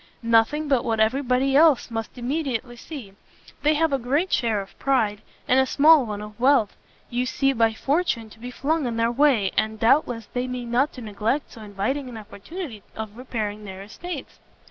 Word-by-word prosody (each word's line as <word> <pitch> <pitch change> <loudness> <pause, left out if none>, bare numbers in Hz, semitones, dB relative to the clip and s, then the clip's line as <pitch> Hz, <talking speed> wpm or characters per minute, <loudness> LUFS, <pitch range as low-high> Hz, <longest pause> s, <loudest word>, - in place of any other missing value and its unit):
"Nothing 230 +7 +3
but 270 -4 +2
what 225 -3 -1
every 220 +6 +2
body 265 +1 +1
else 295 -5 +5
must 225 +2 -5
immediately 250 -2 -2
see; 240 -5 -9 0.5
they 300 +1 +3
have 320 -1 +1
a 275 - +1
great 285 +10 0
share 225 -4 +1
of 195 -1 -10
pride, 220 -7 +1 0.3
and 255 - +4
a 265 - +4
small 295 -2 +5
one 210 -1 -5
of 210 0 -11
wealth; 255 -4 +3 0.4
you 245 +1 0
seem 270 +1 +1
by 225 -1 +4
fortune 275 -5 0
to 225 - -16
be 245 +2 -7
flung 290 +3 -1
in 230 -1 -3
their 230 0 +2
way, 240 -7 +3
and 220 0 0
doubtless 230 -1 +2
they 250 +1 -1
mean 250 -2 -5
not 265 +5 +2
to 255 - -9
neglect 225 +6 -2
so 225 - -12
inviting 215 +7 -3
an 235 - -8
opportunity 220 - -8
of 215 -1 -6
repairing 215 -4 -4
their 190 -1 -8
estates." 300 - -8
245 Hz, 190 wpm, -24 LUFS, 220-275 Hz, 0.5 s, else